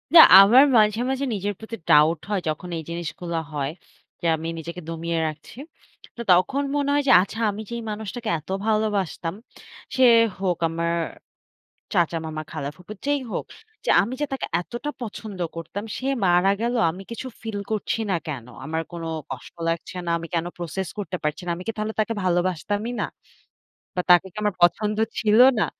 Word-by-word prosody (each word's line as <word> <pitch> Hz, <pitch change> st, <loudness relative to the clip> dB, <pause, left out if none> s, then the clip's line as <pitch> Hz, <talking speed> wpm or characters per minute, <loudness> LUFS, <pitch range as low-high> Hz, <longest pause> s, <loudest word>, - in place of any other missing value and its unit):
না, -, -, +12 dB, 0.2 s
আমার 235 Hz, +7 st, +8 dB
মাঝে, 215 Hz, +1 st, +4 dB
মাঝে 265 Hz, +1 st, -1 dB
নিজের 205 Hz, 0 st, -2 dB
প্রতি 220 Hz, +1 st, -7 dB
doubt 155 Hz, +2 st, +6 dB
হয়। 205 Hz, -3 st, 0 dB
যখন 155 Hz, +4 st, -4 dB
এই 160 Hz, -, -5 dB
জিনিসগুলো 170 Hz, 0 st, -4 dB, 0.2 s
হয়। 140 Hz, 0 st, -2 dB, 0.5 s
যে -, -, -5 dB
আমি 160 Hz, +1 st, -5 dB
নিজেকে 170 Hz, +2 st, -7 dB
দমিয়ে 165 Hz, 0 st, -2 dB
রাখছি। 155 Hz, +8 st, -8 dB, 0.6 s
তো -, -, -4 dB
তখন 185 Hz, +11 st, +3 dB
মনে 285 Hz, -1 st, +1 dB
হয় 290 Hz, 0 st, +2 dB
যে, -, -, +6 dB
"আচ্ছা, 210 Hz, +4 st, -5 dB
আমি 205 Hz, +2 st, -6 dB
যেই 235 Hz, -, -3 dB
মানুষটাকে 220 Hz, +2 st, -5 dB
এত 155 Hz, -, -21 dB, 0.2 s
ভালোবাসতাম। 205 Hz, -5 st, 0 dB, 0.6 s
সে 260 Hz, -, +4 dB, 0.4 s
হোক 185 Hz, -3 st, 0 dB
আমার 170 Hz, +1 st, -1 dB, 1.0 s
চাচা, 170 Hz, -3 st, +2 dB
মামা, 155 Hz, 0 st, -4 dB
খালা, 140 Hz, -, -4 dB
ফুফু 180 Hz, +4 st, -10 dB
যেই 285 Hz, -1 st, +1 dB
হোক। -, -, -3 dB, 0.4 s
যে -, -, -1 dB
আমি 235 Hz, +6 st, -3 dB
যে -, -, +2 dB
তাকে 270 Hz, -, -3 dB
এতটা 240 Hz, +10 st, -5 dB
পছন্দ 215 Hz, -3 st, -7 dB, 0.2 s
করতাম, 190 Hz, +5 st, -5 dB
সে 260 Hz, -, -4 dB, 0.2 s
মারা 180 Hz, +2 st, +4 dB
গেল। 235 Hz, +1 st, 0 dB, 0.2 s
আমি 190 Hz, +3 st, -9 dB
কিছু 245 Hz, +3 st, -5 dB
ফিল 220 Hz, -2 st, -4 dB
করছি 215 Hz, +1 st, -1 dB
না -, -, +2 dB
কেন? 130 Hz, -6 st, -5 dB, 0.2 s
আমার 160 Hz, +1 st, -2 dB
কোন 170 Hz, -1 st, -6 dB, 0.3 s
কষ্ট 130 Hz, -2 st, -8 dB, 0.2 s
লাগছে 165 Hz, +2 st, -3 dB
না। -, -, -2 dB
আমি 165 Hz, 0 st, -7 dB
কেন 165 Hz, 0 st, 0 dB
process 175 Hz, +1 st, -4 dB
করতে 190 Hz, -2 st, -3 dB
পারছি 150 Hz, +3 st, -1 dB
না? -, -, -3 dB
আমি 180 Hz, -, -8 dB
কি -, -, +1 dB
তাহলে 215 Hz, +1 st, -2 dB
তাকে 215 Hz, +1 st, +1 dB
ভালোবাসতামই 185 Hz, +5 st, 0 dB
না? -, -, +1 dB, 0.9 s
বা -, -, +2 dB
তাকে 175 Hz, +1 st, +7 dB
কি -, -, -25 dB
আমার 210 Hz, -2 st, +1 dB
পছন্দ 210 Hz, +5 st, +3 dB, 0.2 s
ছিল 215 Hz, 0 st, +3 dB, 0.2 s
না?" -, -, +3 dB
190 Hz, 180 wpm, -24 LUFS, 170-220 Hz, 1.0 s, না